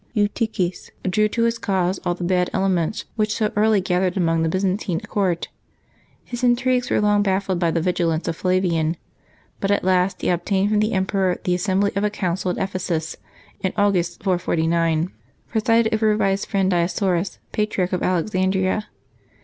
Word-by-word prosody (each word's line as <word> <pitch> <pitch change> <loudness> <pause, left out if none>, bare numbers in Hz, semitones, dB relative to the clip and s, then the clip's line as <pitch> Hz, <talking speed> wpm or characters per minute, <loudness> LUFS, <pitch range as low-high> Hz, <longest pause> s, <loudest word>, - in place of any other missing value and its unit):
Eutyches 205 -3 -1 0.2
drew 215 +3 +3
to 230 +2 0
his 230 0 +1
cause 190 -3 0
all 175 - 0
the 175 - -6
bad 180 0 +1
elements 190 -2 0
which 215 0 +1
so 215 -2 0
early 215 0 +4
gathered 185 +1 0
about 165 -2 +2
the 165 - +1
Byzantine 185 0 -1
court 185 -5 -1 0.8
His 240 0 -6
intrigues 250 0 +2
were - - +2
long 210 0 +3
baffled 190 -2 0
by 170 -1 +2
the 165 0 0
vigilance 170 -2 0
of 165 - -1
Flavian; 170 -3 +1 0.6
but 195 - -1
at 200 - +2
last 185 0 +1
he - - +1
obtained 190 +3 +1
from 210 - +3
the 215 +2 +1
emperor 190 -1 +1
the 180 - +1
assembly 190 +2 +1
of 200 - 0
a 210 - +2
council 185 -2 -2
at 180 - -2
Ephesus, 180 -4 -2 0.4
in 190 - -2
August 180 -4 +1
449, 170 -2 +1 0.4
presided 225 0 +2
over 215 -1 +2
by 200 -2 +2
his 195 +1 -1
friend 195 -1 +1
Dioscorus, 180 +1 0
Patriarch 210 -4 -1
of 180 - 0
Alexandria. 190 +2 0
190 Hz, 165 wpm, -22 LUFS, 175-210 Hz, 0.8 s, early